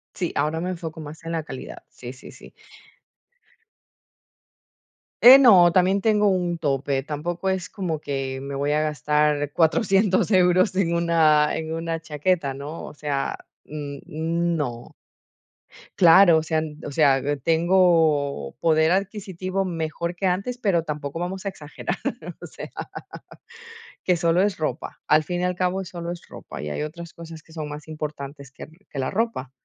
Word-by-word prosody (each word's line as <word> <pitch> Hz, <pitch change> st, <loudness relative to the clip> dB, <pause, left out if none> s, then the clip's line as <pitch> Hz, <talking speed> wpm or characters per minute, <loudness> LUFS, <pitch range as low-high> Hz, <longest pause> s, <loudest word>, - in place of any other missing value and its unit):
Sí, 175 Hz, -3 st, -3 dB
ahora 155 Hz, +3 st, 0 dB
me 180 Hz, +2 st, -3 dB
enfoco 165 Hz, -2 st, -6 dB
más 155 Hz, +1 st, -9 dB
en 165 Hz, -, -5 dB
la 165 Hz, -2 st, -2 dB
calidad. 130 Hz, -, -9 dB
Sí, 125 Hz, 0 st, -9 dB
sí, 130 Hz, -, -13 dB
sí. -, -, -15 dB, 2.7 s
Eh, 255 Hz, +3 st, +12 dB
no, 190 Hz, -10 st, +7 dB
también 190 Hz, +2 st, +3 dB
tengo 210 Hz, -1 st, +3 dB
un 175 Hz, -2 st, 0 dB
tope. 135 Hz, -3 st, -1 dB
Tampoco 170 Hz, +5 st, -4 dB
es 185 Hz, -1 st, -3 dB
como 175 Hz, -7 st, -3 dB
que 135 Hz, -1 st, -3 dB
me 140 Hz, 0 st, -6 dB
voy 145 Hz, +1 st, -1 dB
a 150 Hz, +1 st, +2 dB
gastar 150 Hz, 0 st, +1 dB
400€ 195 Hz, +4 st, +2 dB
euros 185 Hz, +1 st, +4 dB
en 170 Hz, -3 st, +1 dB
una 160 Hz, -3 st, +3 dB
en 160 Hz, 0 st, -4 dB
una 165 Hz, 0 st, -3 dB
chaqueta, 150 Hz, -2 st, -1 dB
¿no? 145 Hz, +4 st, -7 dB
O -, -, -10 dB
sea, 145 Hz, -2 st, -2 dB, 0.3 s
n 145 Hz, -2 st, -7 dB
no. 160 Hz, -6 st, -2 dB, 1.1 s
Claro, 175 Hz, -1 st, +7 dB
o 160 Hz, -, 0 dB
sea 160 Hz, -1 st, 0 dB, 0.3 s
o -, -, -6 dB
sea, 140 Hz, -3 st, +3 dB, 0.2 s
tengo 160 Hz, -, +2 dB
poder 160 Hz, 0 st, +3 dB
adquisitivo 190 Hz, -1 st, -2 dB
mejor 170 Hz, 0 st, -3 dB
que 190 Hz, -, -3 dB
antes, 200 Hz, +7 st, -1 dB
pero 185 Hz, -8 st, +1 dB
tampoco 150 Hz, 0 st, -5 dB
vamos 185 Hz, +3 st, -4 dB
a -, -, 0 dB
exagerar, 150 Hz, -5 st, -6 dB, 0.5 s
o -, -, -7 dB
sea, -, -, -9 dB, 1.4 s
que 180 Hz, -2 st, +3 dB
solo 170 Hz, +1 st, +2 dB
es 200 Hz, -3 st, 0 dB
ropa. 150 Hz, -2 st, -4 dB
Al 155 Hz, 0 st, +4 dB
fin 175 Hz, +3 st, -3 dB
y -, -, 0 dB
al 180 Hz, 0 st, -1 dB
cabo 185 Hz, +1 st, -1 dB
solo 170 Hz, -1 st, -6 dB
es 175 Hz, -, -9 dB
ropa, -, -, -9 dB
y 75 Hz, -, -4 dB
hay 75 Hz, -, -3 dB
otras 170 Hz, +2 st, -7 dB
cosas 165 Hz, -1 st, -11 dB
que 160 Hz, -, -20 dB
son 155 Hz, -2 st, -5 dB
más 150 Hz, +1 st, -9 dB
importantes 145 Hz, -3 st, -7 dB
que -, -, -10 dB, 0.2 s
que 140 Hz, -, -7 dB
la 130 Hz, -, -1 dB
ropa. 210 Hz, -, -2 dB
165 Hz, 160 wpm, -23 LUFS, 150-180 Hz, 2.7 s, Eh